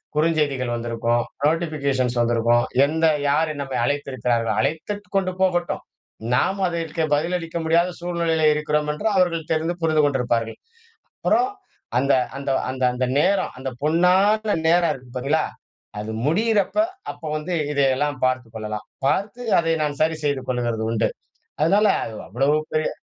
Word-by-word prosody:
குறுஞ்செய்திகள் 150 -5 +1
வந்திருக்கும், 120 0 0 0.2
நோட்டிஃபிகேஷன்ஸ் 140 -6 0
வந்திருக்கும். 120 0 +3 0.2
எந்த 160 +3 0 0.2
யார் 155 +2 +2
நம்மை 135 -2 -3
அழைத்திருக்கிறார்கள், 125 -5 -1
அழைத்து 160 - -1 0.2
கொண்டு 190 -1 +1
போகட்டும். 175 -2 0 0.5
நாம 190 +10 +1
அதற்கு 165 -1 -2
பதிலளிக்க 165 +2 -1
முடியாத 170 +2 +3
சூழ்நிலையிலே 170 -2 +1
இருக்கிறோம் 150 0 0
என்று 150 - -7
அவர்கள் 170 -4 +1
தெரிந்து 160 +2 0
புரிந்து 155 -2 +3
கொண்டிருப்பார்கள். 120 -5 0 0.6
அப்புறம் 375 +3 +2 1.4
அந்த 125 +1 -1
நேரம் 195 +5 +2
அந்த 130 0 -3
பொன்னான 190 +7 +3
நேரம் 170 -1 +4
இருக்கு 130 -3 -12
பார்த்தீங்களா? 140 +5 +1 0.6
அது 105 +1 -5
முடியிறப்ப 205 - +1 0.4
அப்ப - - -21 0.2
வந்து 160 +4 -4 0.2
இதையெல்லாம் 140 0 +1
பார்த்துக் 130 -3 -1
கொள்ளலாம். 105 -1 -5 0.2
பார்த்து 205 - -1 0.2
அதை 165 -1 +1
நான் 145 -2 -3
சரி 160 0 +2
செய்து 140 -3 0
கொள்கிறது 120 -3 -1
உண்டு. 115 - +1 0.5
அதனால 200 +7 +4 0.2
அது 110 - -7
அவ்வளவு 135 - +2 0.2
பெரிய 155 0 +1
150 Hz, 125 wpm, -22 LUFS, 125-170 Hz, 1.4 s, நேரம்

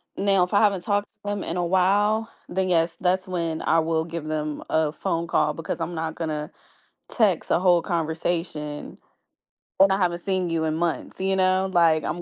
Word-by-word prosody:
now 195 -2 +3
if 180 - -3
I 200 - +5
haven't 200 -4 +3
talked 205 +1 0
to 210 - -25
them 205 -1 -2
in 170 - -4
a 175 - 0
while, 205 +5 +2 0.2
then, 185 0 -1
yes, 165 -1 +2
that's 185 +1 0
when 165 -3 -2
I 165 - +3
will 160 0 0
give 170 -2 -6
them 155 -1 -3
a 160 -1 +1
phone 165 +2 -2
call - - +1
because 165 +1 -5
I'm 170 +1 -3
not 160 0 -3
gonna 155 -2 -4 0.6
text 205 -8 +1
a - - +4
whole 175 -2 +4
conversation 160 -2 -3 0.8
when 195 +1 +7
I 195 - +3
haven't 175 -3 0
seen 185 -1 -1
you 160 -1 0
in 155 0 -1
months, 170 0 -2
you 190 0 +1
know, 190 0 +2
like, 165 -3 +4
I'm 175 - -3
175 Hz, 195 wpm, -24 LUFS, 160-190 Hz, 0.8 s, when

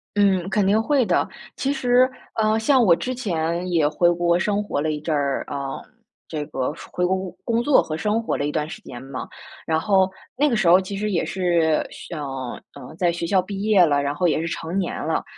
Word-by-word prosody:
嗯， 195 -3 +2
肯 195 0 +1
定 210 +3 +3
会 275 +1 +2
的， - - +1 0.3
其 270 - -1
实， 255 -2 +3 0.3
呃， 215 0 +2
像 255 +3 +4
我 185 -6 +6
之 255 +9 -2
前 175 -6 -2
也 160 -4 +3
回 175 +3 +3
国 170 0 +2
生 205 +3 0
活 205 -8 -2
了 155 +1 0
一 150 - -3
阵 155 +1 -1
儿， 140 -1 -1
呃， 140 -1 -4 0.5
这 150 -2 -4
个 130 +2 -2 0.2
回 180 - 0
国 185 +1 +2
工 185 -1 -7
工 235 0 +1
作 290 +1 +5
和 155 - -4
生 210 +7 0
活 225 - -2
了 145 - -1
一 145 - -1
段 150 0 -2
时 - - -8
间 120 - -9
嘛， 135 -1 -7 0.4
然 160 -1 +1
后 190 +1 +2 0.2
那 295 +2 +3
个 240 - +1
时 205 -5 +1
候 180 +3 +7
其 195 +1 -6
实 210 +1 -2
也 175 - +1
是 170 -4 +1
想， 150 -4 -7 0.5
呃， 125 - -11
在 180 -1 +2
学 170 0 -2
校 185 +2 +3
毕 195 +1 -6
业 205 -4 +5
了， 145 -2 +1
然 140 0 -1
后 175 +4 +1
也 155 - +1
是 165 - -2
成 165 +3 -4
年 190 -3 -1
了。 - - 0
180 Hz, 245 characters per minute, -23 LUFS, 160-210 Hz, 0.5 s, 候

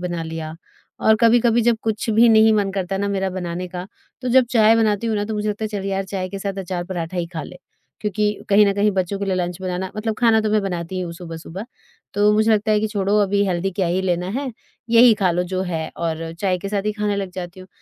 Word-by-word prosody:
बना 175 -2 -3
लिया 160 -1 -6 0.5
और 220 - +4
कभी-कभी 235 0 +4
जब 230 - +1
कुछ 220 0 -2
भी 225 +2 +5
नहीं 220 0 +6
मन 205 -2 +1
करता 195 0 -2
ना 200 +1 -1
मेरा 195 -1 -1
बनाने 180 0 -4
का 180 0 -6 0.4
तो 250 - -2
जब 255 +1 +5
चाय 225 -2 +5
बनाती 220 0 +1
हूँ 220 - 0
ना 205 - -1
तो 220 - -4
मुझे 210 0 -2
लगता 210 +1 -3
है 215 - -2
चल 205 -2 -4
यार 195 0 -1
चाय 190 -1 -4
के 195 - -6
साथ 195 0 -4
अचार 180 -2 -4
पराठा 175 -1 -5
ही 175 -1 -1
ख़ा 160 - -3
ले। 180 - -10 0.4
क्योंकि 210 0 0 0.2
कहीं 205 0 +6
न 200 - +2
कहीं 205 +1 +2
बच्चों 190 +1 -1
के 200 - -2
लिए 195 - 0
लंच 180 0 -3
बनाना 185 0 -3
मतलब 220 +1 -2
ख़ाना 225 -2 +4
तो 215 -1 -1
मैं 215 0 +3
बनाती 180 -1 -4
हूँ 175 -2 -4
सुबह-सुबह। 170 +2 -8 0.5
तो 205 +1 +4
मुझे 215 +1 +3
लगता 215 0 +2
है 210 - +3
कि 220 - 0
छोड़ो 205 -1 0
अभी 200 0 +1
हेल्दी 185 +1 -1
क्या 185 0 0
ही 175 +2 0
लेना 180 -1 0
है, 265 +2 -3 0.4
यही 235 0 +7
ख़ा 195 -4 +1
लो 175 +1 0
जो 185 - 0
है 165 -3 -3
और 165 -1 -3
चाय 185 -2 +1
के 200 +2 -5
साथ 200 -1 -1
ही 210 - +1
ख़ाने 210 -1 -1
लग 195 -2 -3
जाती 180 0 -7
हूँ। 185 - -13
195 Hz, 255 wpm, -21 LUFS, 180-215 Hz, 0.5 s, यही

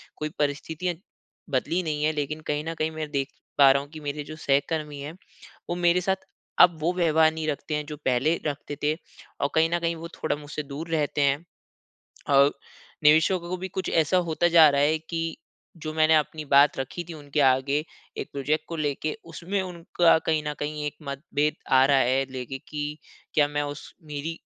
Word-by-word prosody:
कोई 155 - -3
परिस्थितियाँ 160 +4 -1 0.5
बदली 160 +7 0
नहीं 150 -2 -2
हैं, 155 +1 +2
लेकिन 150 +1 -3
कहीं 150 0 -1
न - - -2
कहीं 155 +1 0
मैं 155 -1 -5
देख 140 -2 -1 0.3
पा 135 -1 +8
रहा 140 +1 +2
हूँ 145 - -12
कि 155 - -8
मेरे 145 0 -4
जो 155 +2 -9
सहकर्मी 145 0 -1
हैं, 150 +3 -6 0.6
वो 175 - -1
मेरे 175 0 +3
साथ 190 +2 +1 0.5
अब 175 -2 +7
वो 170 +3 +1
व्यवहार 160 -3 +4
नहीं 160 -1 -4
रखते 150 +1 -2
हैं, 150 0 -2
जो 150 0 -7
पहले 130 +6 +2
रखते 145 0 -4
थे 150 +1 +3 0.5
और 140 - +2
कहीं 160 +1 +4
न 175 - +2
कहीं 170 0 -1
वो 165 +1 -7
थोड़ा 155 - -1
मुझसे 145 0 -6
दूर 145 +4 -7
रहते 150 -2 0
हैं। 140 0 +3 0.9
अ, 140 0 +6 0.5
निवेशकों 160 +5 +5
को 185 - -2
भी 190 +1 -5
कुछ 190 0 -4
ऐसा 165 +2 +3
होता 175 +2 +2
जा 160 -2 +10
रहा 140 - +1
है 155 +2 +3
कि 165 +1 -4 0.4
जो 155 -1 -5
मैंने 160 0 +4
अपनी 155 0 -1
बात 140 0 +5
रखी 135 +6 -4
थी 170 - -6
उनके 145 -1 -3
आगे, 140 +3 +3 0.3
एक - - -5
प्रोजेक्ट 145 +3 -1
को 165 - -4
लेके, 150 0 -2
उसमें 170 +4 -3
उनका 170 -2 +2
कहीं 155 -1 +2
न 150 - -2
कहीं 150 0 -3
एक 150 - -3
मतभेद 145 +2 -1 0.2
आ 130 0 +7
रहा 140 0 +4
है, 130 +2 +2
लेके 130 +1 -5
कि 150 0 -4 0.4
क्या 150 -1 +5
मैं 145 0 -1
उस 145 0 -7
मेरी 150 +2 -5
150 Hz, 200 wpm, -26 LUFS, 145-160 Hz, 0.9 s, जा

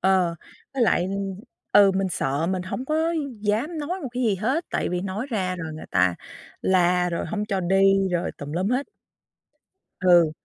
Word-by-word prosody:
Ờ, 185 -3 +3 0.4
với 260 - +1
lại, 220 - +3
ừm, 195 0 -3 0.4
ừ, 200 -1 +7
mình 195 0 +1
sợ 145 0 -1
mình 185 0 -1
hổng 190 +7 -4
có 320 +4 0 0.3
dám 225 +11 -1
nói 350 +6 -3
một 270 - -3
cái 250 - -2
gì 220 -4 +2
hết, 260 - 0
tại - - -1
vì 180 0 -1
nói 200 +6 -3
ra 185 -5 -1
rồi 165 -2 -5
người 155 - -9
ta 90 -1 +3 0.5
la 180 -1 +3
rồi 170 - -2
hổng 210 -1 -2
cho 195 -3 0
đi 195 +1 +3
rồi 175 -1 -1
tùm 145 0 -6
lum 180 +4 0
hết. 255 +4 0 1.1
Ừ, 175 -4 +5
190 Hz, 190 wpm, -24 LUFS, 180-220 Hz, 1.1 s, ừ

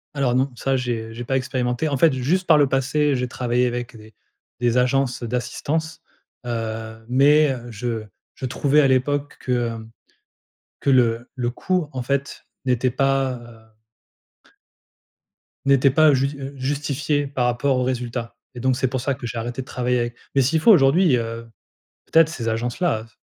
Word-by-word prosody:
Alors 135 -4 +1
non, 130 +2 +2
ça 135 +2 0
j'ai 115 -3 -3
j'ai 120 +2 -6
pas 130 - -1
expérimenté. 130 +2 -1
En 140 - -1
fait, 160 +2 +4
juste 155 +9 0
par 160 - +6
le 145 -2 +4
passé 140 +2 +1
j'ai 125 - -2
travaillé 125 0 0
avec 120 -1 -4
des 110 0 -15 0.5
des 120 0 +2
agences 125 0 +1
d'assistance, 145 +7 -3 0.4
heu, 110 -1 -5
mais, 145 +3 +5
heu, 120 -2 -6
je 115 0 -4 0.3
je - - -6
trouvais 140 +4 +2
à 140 - +5
l'époque 140 +2 0
que, 125 - -4
hem, 115 -2 -2 0.9
que - - -1
le 120 -3 +2
le 120 -2 -1
coût 180 +4 -1
en 130 - -4
fait 140 +3 -3 0.2
n'était 125 0 +2
pas, 135 +1 +1 0.4
heu 110 - -33 1.9
n'était 140 0 +5
pas 155 +1 +5
jus 140 +2 0
heu, 135 +1 -6
justifié 145 +1 -1
par 135 -3 -1
rapport 125 +2 +1
au 125 - +1
résultat 120 -2 -3 0.2
et - - -7
donc 130 -1 +1
c'est 130 - +1
pour 130 0 -3
ça 135 +1 -1
que 120 - -7
j'ai 115 +1 -5
arrêté 120 +3 -4
de - - -10
travailler 125 -1 -1
avec. 120 0 -3 0.2
Mais 135 - +4
s'il 155 +5 +1
faut 230 - +7
aujourd'hui, 155 - +5
heu, 115 0 -4 0.6
peut-être 160 -1 +4
ces 115 -8 -3
agences-là, 120 +4 -1
heu, 110 - -11
s 115 - -25
130 Hz, 180 wpm, -22 LUFS, 120-140 Hz, 1.9 s, faut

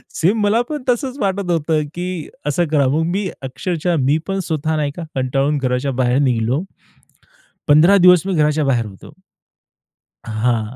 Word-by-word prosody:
Same 200 +6 +1
मला 210 +3 +3
पण 300 -3 -4
तसंच 255 +2 -1
वाटत 195 -3 -1
होतं, 160 -1 +1
की 175 -2 -4 0.2
असं 160 +4 +1
करा. 145 -3 +3
मग 150 +5 +1
मी 190 +4 -1
अक्षरशः 170 +6 -2
मी 140 +3 +2
पण 195 0 -2
स्वतः 160 0 -1
नाही 150 -2 -1
का 175 - -6
कंटाळून 135 +3 0
घराच्या 130 0 -1
बाहेर 125 0 +1
निघालो. 130 +3 0 1.0
15 160 +7 +6
दिवस 180 -2 +6
मी 195 - -1
घराच्या 150 -1 +2
बाहेर 125 -4 +1
होतो. 100 -3 -13 1.1
हां, 110 +1 -1
155 Hz, 155 wpm, -18 LUFS, 130-180 Hz, 1.1 s, 15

